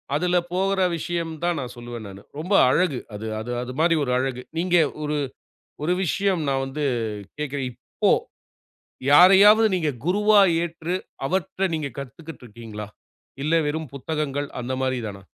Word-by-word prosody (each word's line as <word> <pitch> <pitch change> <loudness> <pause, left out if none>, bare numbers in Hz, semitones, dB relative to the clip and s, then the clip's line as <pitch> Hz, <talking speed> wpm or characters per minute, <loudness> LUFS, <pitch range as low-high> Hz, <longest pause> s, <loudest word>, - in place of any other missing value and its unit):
அதில 180 +4 +1 0.2
போகுற 190 +1 +1 0.2
விஷயம் 170 0 -3
தான் 175 -1 +1
நான் 125 -2 -5
சொல்வேன் 120 -2 -7
நானு. 100 0 -10 0.2
ரொம்ப 180 +6 -2 0.2
அழகு. 150 -2 +2
அது 105 +2 -6
-அது 115 +3 -5
-அது 125 - -5
மாரி 165 +1 +4
ஒரு 125 - -1
அழகு. 130 -1 -2 0.2
நீங்க 175 +1 +1 0.3
ஒரு 150 0 -1 0.7
ஒரு 175 +4 +2
விஷயம் 190 +1 +1
நான் 135 0 0
வந்து 140 +3 -4 0.5
கேட்கிறேன். 145 -3 -3
இப்போ 120 - -22 1.3
யாரையாவது 200 +6 +8
நீங்க 160 -4 +1
குருவா 205 +4 +4 0.2
ஏற்று 170 +1 -3 0.3
அவர்ட்ட 190 +3 -1
நீங்க 150 -3 -2
கத்துக்கிட்டு 140 +2 -9
இருக்கிங்களா? 105 -2 -8 0.6
இல்ல 155 +2 +2
வெறும் 155 -1 -3
புத்தகங்கள் 145 0 -3
அந்த 125 +2 -4
மாரி 130 -1 0
தானா? 100 -2 -7
150 Hz, 145 wpm, -24 LUFS, 130-175 Hz, 1.3 s, யாரையாவது